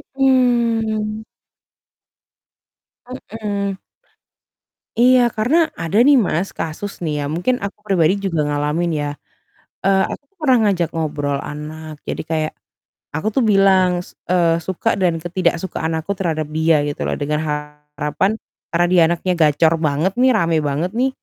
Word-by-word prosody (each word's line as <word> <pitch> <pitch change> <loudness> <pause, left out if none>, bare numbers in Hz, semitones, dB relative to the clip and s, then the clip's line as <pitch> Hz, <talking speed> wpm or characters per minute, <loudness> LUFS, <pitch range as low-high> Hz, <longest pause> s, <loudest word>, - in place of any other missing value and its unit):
Hmm. 230 -5 +1 1.8
Hmm. 205 -5 -4 1.2
Iya, 255 +1 +6 0.2
karena 240 +9 +2 0.2
ada 165 +5 -1
nih 290 - +7
Mas, 175 +3 -1
kasus 180 +6 -4
nih 155 -2 -1
ya, 145 - -2
mungkin 180 +10 +1
aku 200 - -7
pribadi 180 -3 +3
juga 170 -5 -1
ngalamin 150 +4 0
ya. 145 - -2 0.8
Eee, 195 0 +4
aku - - -7 0.2
pernah 265 -5 +4
ngajak 180 -6 +1
ngobrol 145 -3 -2
anak, 155 +1 -7
jadi - - -3
kayak 155 -1 0 0.6
aku 160 +7 -2
tuh 265 - +3
bilang, 195 -2 +5 0.2
s - - -15 0.2
eee, 170 -2 +3
suka 190 +4 -1
dan 180 -2 +3
ketidaksukaan 175 -2 -1
aku 165 +5 -5
terhadap 160 -5 -1
dia 160 0 +4
gitu 145 - -5
loh, - - -1
dengan 150 +1 0
harapan, 150 +4 -2 0.4
karena 175 +1 +2
dia 180 - +5
anaknya 175 +2 -1
gacor 155 +2 +4
banget 155 +6 +1
nih, 260 - +5
rame 170 -5 +2
banget 160 +7 -1
nih, 265 +1 +3
175 Hz, 135 wpm, -19 LUFS, 155-210 Hz, 1.8 s, nih